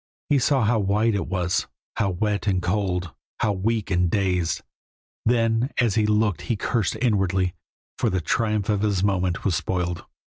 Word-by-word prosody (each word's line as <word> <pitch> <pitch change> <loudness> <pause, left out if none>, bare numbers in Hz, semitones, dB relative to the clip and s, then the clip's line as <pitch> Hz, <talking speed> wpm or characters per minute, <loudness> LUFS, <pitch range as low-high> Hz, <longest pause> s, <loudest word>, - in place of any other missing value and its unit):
He 145 - +5
saw 130 0 +2
how 110 +1 +2
white 105 +3 +2
it 100 - -1
was, 90 -1 0 0.3
how 105 -4 +1
wet 100 +2 -1
and 95 -2 +2
cold, 90 -3 -1 0.3
how 105 - +2
weak 105 +2 -1
and 90 -1 +2
dazed, 90 -3 0 0.6
then 115 +1 +2
as 120 -4 +3
he 110 -1 +2
looked 105 -3 +1
he 115 - +2
cursed 110 0 -1
inwardly, 95 -6 +1 0.5
for - - +2
the 95 - 0
triumph 105 +3 0
of 105 -2 +1
his 100 -3 +1
moment 95 -3 0
was 95 - +2
spoiled. 90 0 -2
100 Hz, 170 wpm, -24 LUFS, 90-110 Hz, 0.6 s, He